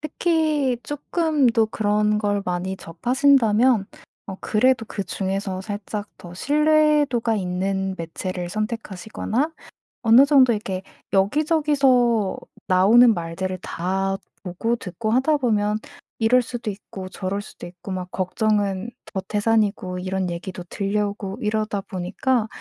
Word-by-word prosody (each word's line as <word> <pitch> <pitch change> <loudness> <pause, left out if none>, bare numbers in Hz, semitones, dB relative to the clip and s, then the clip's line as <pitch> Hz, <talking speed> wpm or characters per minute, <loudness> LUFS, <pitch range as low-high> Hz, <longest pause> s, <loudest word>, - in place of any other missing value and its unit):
특히 305 -4 +1
쪼끔도 290 -6 +1
그런 210 -1 +1
걸 205 -1 0
많이 180 +2 -2
접하신다면 240 +3 +3 0.4
어 195 - -6
그래도 240 +2 +2
그중에서 195 -1 -3
살짝 205 +1 -5
더 175 - -11
신뢰도가 295 - +2
있는 190 0 -2
매체를 175 +2 -4
선택하시거나 220 - -3 0.5
어느 235 +4 +7
정도 270 -4 +5
이렇게 190 -3 -4 0.3
여기저기서 260 - +2 0.3
나오는 220 +6 +6
말들을 180 +1 -4
다 190 +4 -2 0.3
보고 200 +6 -1
듣고 215 +1 -4
하다 265 +6 +3
보면 215 -5 +1 0.4
이럴 240 +3 +4
수도 240 -2 -5
있고 195 -1 -8
저럴 190 +2 -3
수도 205 - -11
있고 185 +2 -10
막 185 -1 -5
걱정은 200 +2 0 0.2
더 190 - -1
태산이고 210 -3 0
이런 185 0 -2
얘기도 175 +1 -6
들려오고 200 0 -2
이러다 215 -2 -1
보니까 210 +7 -1
210 Hz, 275 characters per minute, -23 LUFS, 190-245 Hz, 0.5 s, 어느